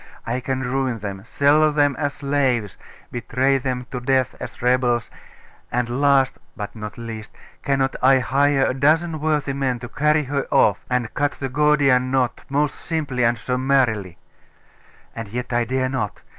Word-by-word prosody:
I 120 +2 -1
can 130 +1 -2
ruin 130 -1 -1
them 100 -2 -6
sell 150 +3 +3
them 145 -2 +2
as 145 -2 -1
slaves 135 -7 0 0.4
betray 130 +3 +1
them 125 -1 -3
to 125 - -3
death 130 0 +1
as - - -8
rebels 125 -1 +1 0.6
and 125 +2 -1
last, 140 -2 +3 0.2
but 105 0 -6
not 105 -1 -7
least, 115 -2 -7 0.3
cannot 135 -1 0
I 135 +1 +6
hire 135 +2 +2
a - - 0
dozen 155 +4 +2
worthy 150 -2 0
men 135 -2 -1
to 120 0 -8
carry 150 +3 +2
her 140 0 -2
off, - - +3
and 125 -2 -1
cut 145 0 0
the 135 - -5
Gordian 135 -2 +3
knot 130 -2 0
most 145 0 +1
simply 145 -7 -2
and 115 0 +2
summarily? 125 -6 0 1.0
And 115 -1 -5
yet 125 +4 -5
I 120 0 +2
dare 130 +2 0
not. 105 -6 -3
130 Hz, 160 wpm, -22 LUFS, 120-140 Hz, 1.0 s, I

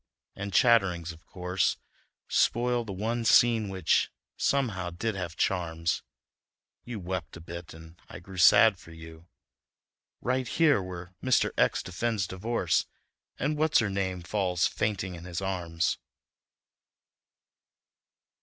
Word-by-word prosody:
and 100 0 -5
chatterings, 95 - +3
of 80 +1 -15
course, 90 0 -1 0.5
Spoil 120 0 +2
the 105 - -6
one 115 +5 -2
scene 115 -2 +4
which, 95 -4 +1 0.3
somehow, 105 -11 0
did 110 +6 -3
have 90 -4 -5
charms; 85 -3 -1 0.8
You 120 -3 -6
wept 90 -1 -5
a - - -10
bit, 85 +1 -9
and 80 +1 -14
I - - -8
grew 95 +1 -9
sad 100 +3 +7
for 85 - -15
you 80 0 -12 0.9
Right 130 0 -1
here! 150 -5 +3
Where 90 -1 -8
Mr. 130 -1 +3
X - - +2
defends 100 +3 -1
divorce 95 -3 -1 0.5
And 150 +2 -1
What's 155 0 +3
Her 105 -4 +2
Name 95 -2 -2
falls 90 -2 0
fainting 100 -3 -1
in 85 0 -9
his 90 -2 -4
arms." 85 -4 -1
95 Hz, 125 wpm, -28 LUFS, 85-115 Hz, 0.9 s, sad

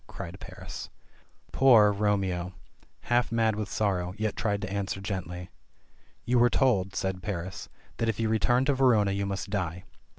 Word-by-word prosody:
cried - - -8
Paris. - - -8 0.6
Poor, 115 -6 +6
Romeo, 95 -3 0 0.5
half 120 0 +1
mad 115 -2 +2
with 105 -2 -4
sorrow, 95 -3 -1
yet 110 -1 -1
tried 100 -2 -1
to 95 - -4
answer 100 -1 -2
gently. 90 -3 -5 0.7
"You 120 +1 +3
were 120 +1 +5
told," 100 -8 +2
said 95 -1 -2
Paris, 95 -2 -5 0.3
"that 115 - 0
if 110 - -2
you 115 - +1
returned 120 +4 +2
to 140 - +3
Verona 120 -7 +3
you 100 0 -1
must 100 0 -4
die." 90 -3 -2
100 Hz, 160 wpm, -28 LUFS, 95-115 Hz, 0.7 s, Poor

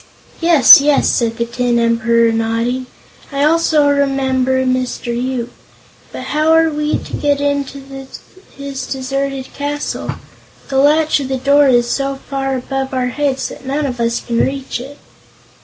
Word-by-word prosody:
"Yes, 315 -6 +8
yes," 290 0 +2
said 230 -1 0
the 235 - -1
Tin 240 0 -1
Emperor, 230 0 +2
nodding; 230 +3 -1 0.4
"I 280 0 -1
also 310 -1 +3
remember 265 -2 +1
Mr. 255 -2 -2
Yoop. 245 -1 -3 0.6
But - - -7
how 310 +1 +1
are 325 0 +4
we 300 0 -1
to - - -11
get 285 -1 0
into 285 -1 -2 0.8
his 275 -2 -6
deserted 270 0 -4
castle? 290 +1 -4 0.6
The 270 -1 +1
latch 300 +2 +3
of 275 - -4
the 265 0 -2
door 280 +2 +4
is 240 -2 +3
so 275 +2 -1
far 270 -1 -2
above 265 +1 -4
our 250 -1 0
heads 270 0 -2
that - - -11
none 280 +3 -2
of 250 -3 -4
us 235 0 0
can 235 -1 -2
reach 270 -2 -2
it." 275 +4 -10
270 Hz, 155 wpm, -16 LUFS, 250-285 Hz, 0.8 s, Yes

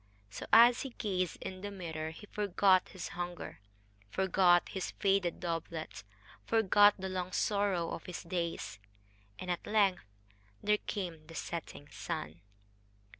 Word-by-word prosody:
So, - - -7
as 240 +1 +8
he 270 - -4
gazed 185 -5 -1
in 185 0 -6
the 205 - -4
mirror, 160 -5 -5
he 160 +6 -11
forgot 200 -2 +3
his 185 -3 -6
hunger, 175 -7 -6 0.5
forgot 180 - +3
his 190 -2 -3
faded 195 -4 +2
doublet, 165 -2 -4 0.4
forgot 205 -2 +5
the 190 -1 -4
long 185 -1 -3
sorrow 200 -4 +1
of - - -6
his 180 - -6
days 170 - -3 0.6
and 180 - -4
at 175 - -4
length 200 -4 +3 0.6
there 210 0 +3
came 170 -6 -5
the 165 - -11
setting 160 -4 -5
sun. 80 +3 -5
185 Hz, 135 wpm, -33 LUFS, 170-200 Hz, 0.6 s, as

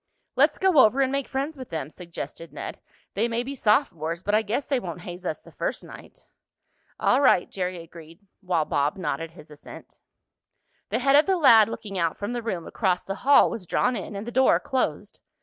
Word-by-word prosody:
"Let's - - +3
go 380 -6 +3
over 260 +3 +5
and 265 -1 +1
make 275 -1 -2
friends 280 +4 -3
with 260 -2 -9
them," 155 -3 -5
suggested 170 -1 -8
Ned. - - -7 0.3
"They 220 +4 +1
may 235 +1 -1
be 270 +3 -5
sophomores, 185 - 0
but 205 - -1
I 215 - +4
guess 225 +6 -2
they 275 -3 0
won't 175 -5 -7
haze 175 +1 -7
us 155 - -4
the - - -15
first - - -3
night." - - -13 0.7
"All 255 - +3
right," 220 -10 +4
Jerry 185 -1 -4
agreed, 165 0 -14 0.2
while 175 -5 0
Bob 145 +2 0
nodded 165 -3 -3
his 155 -2 -16
assent. 150 - -13 0.9
The - - 0
head 275 +2 +3
of 295 +5 +5
the 380 -1 +2
lad 230 -9 +6
looking 200 -4 -6
out 165 -2 0
from 205 +4 -4
the 240 - -3
room 185 -8 -4
across 185 -4 -1
the 195 - -3
hall 280 +2 +5
was 185 -6 -6
drawn 250 +7 +1
in, 200 0 -6
and 200 +2 -5
the 240 - -6
door 260 +2 +4
closed. 260 -1 -3
205 Hz, 205 wpm, -25 LUFS, 170-260 Hz, 0.9 s, lad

